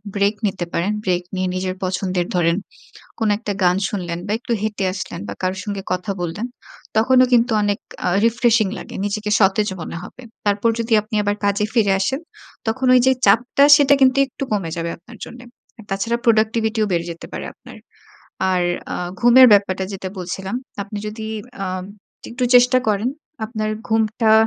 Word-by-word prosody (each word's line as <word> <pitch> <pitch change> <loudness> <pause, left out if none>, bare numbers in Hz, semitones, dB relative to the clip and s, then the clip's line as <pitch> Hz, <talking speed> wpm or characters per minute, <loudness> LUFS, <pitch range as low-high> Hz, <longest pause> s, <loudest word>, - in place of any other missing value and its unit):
break 200 +1 +2
নিতে 190 -3 -3
পারেন। 185 +5 0
Break 180 -1 +1
নিয়ে 185 0 -1
নিজের 185 0 -2
পছন্দের 185 -1 -1
ধরেন 170 -1 +2 0.6
কোন 225 - +1
একটা 215 -2 -4
গান 180 0 +4
শুনলেন 175 -4 -4
বা 205 - -2
একটু 240 0 -4
হেঁটে 210 -2 -2
আসলেন 185 - -6
বা 100 - -4
কারো 185 +1 0
সঙ্গে 200 -2 -4
কথা 180 +3 -3
বললেন 175 +7 -3 0.5
তখনও 255 +3 +5
কিন্তু 240 0 +4
অনেক 205 -1 0 0.3
আ - - +3 0.2
refreshing 230 -3 +2
লাগে, - - -10
নিজেকে 210 +1 -2
সতেজ 205 +1 +3
মনে 160 - -6
হবে। 255 - -11 0.2
তারপর 205 +3 +2
যদি 230 0 -3
আপনি 215 +2 -9
আবার 205 0 0
কাজে 200 +1 +1
ফিরে 205 -4 +3
আসেন 265 +9 0 0.5
তখন 260 +4 -1
ওই 250 - +6
যে, 265 - +6
চাপটা 245 +7 +4
সেটা 285 -1 +5
কিন্তু 265 0 +4
একটু 270 +1 -6
কমে 195 -6 -1
যাবে 170 0 -2
আপনার 230 +7 -15
জন্যে। 245 +1 -12 0.5
তাছাড়া 200 +5 0
productivity 220 0 +2
ও - - -2
বেড়ে 170 0 0
যেতে 165 - -11
পারে - - -5
আপনার। - - -14 0.7
আর 180 -1 +1 0.3
আ - - -2 0.2
ঘুমের 245 +2 +8
ব্যাপারটা 190 -2 +3
যেটা 190 -1 -5
বলছিলাম, 190 +3 -5 0.3
আপনি 205 +1 -7
যদি 220 +1 -7 0.4
আ - - -3 0.6
একটু 250 +2 -2
চেষ্টা 250 +1 +6
করেন, 210 +3 +1 0.4
আপনার 215 -1 -3 0.2
ঘুমটা 220 0 +2
210 Hz, 170 wpm, -20 LUFS, 190-230 Hz, 0.7 s, ঘুমের